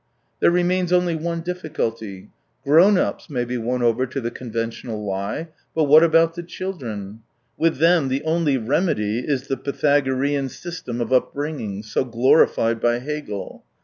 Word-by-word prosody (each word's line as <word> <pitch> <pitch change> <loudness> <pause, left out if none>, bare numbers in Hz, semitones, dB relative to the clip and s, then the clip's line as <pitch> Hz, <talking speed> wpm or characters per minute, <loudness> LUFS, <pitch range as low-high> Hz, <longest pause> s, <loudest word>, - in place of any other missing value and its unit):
There - - +5
remains 180 +1 +1
only 180 -2 +2
one 170 +1 -3
difficulty: 115 - -4 0.3
grown 170 +8 +6
ups 180 - -2
may 125 -4 -1
be 125 +1 -3
won 125 +2 -1
over 120 +2 +2
to 135 +2 -4
the 120 -2 -3
conventional 115 -2 -5
lie, 100 +11 -3 0.3
but 160 - +3
what 150 +2 +7
about 165 0 +4
the 175 - -6
children? 120 - -6 0.4
With 165 -2 +1
them 165 -1 +4
the 135 +2 -1
only 160 -3 +1
remedy 120 - 0
is 135 0 -2
the 135 -1 -2
Pythagorean 140 -1 0
system 130 -7 -6
of 120 - -1
upbringing, 130 -6 -1
so 110 - -1
glorified 115 -1 +3
by 120 0 +2
Hegel. 135 -6 -6
135 Hz, 150 wpm, -22 LUFS, 115-165 Hz, 0.4 s, what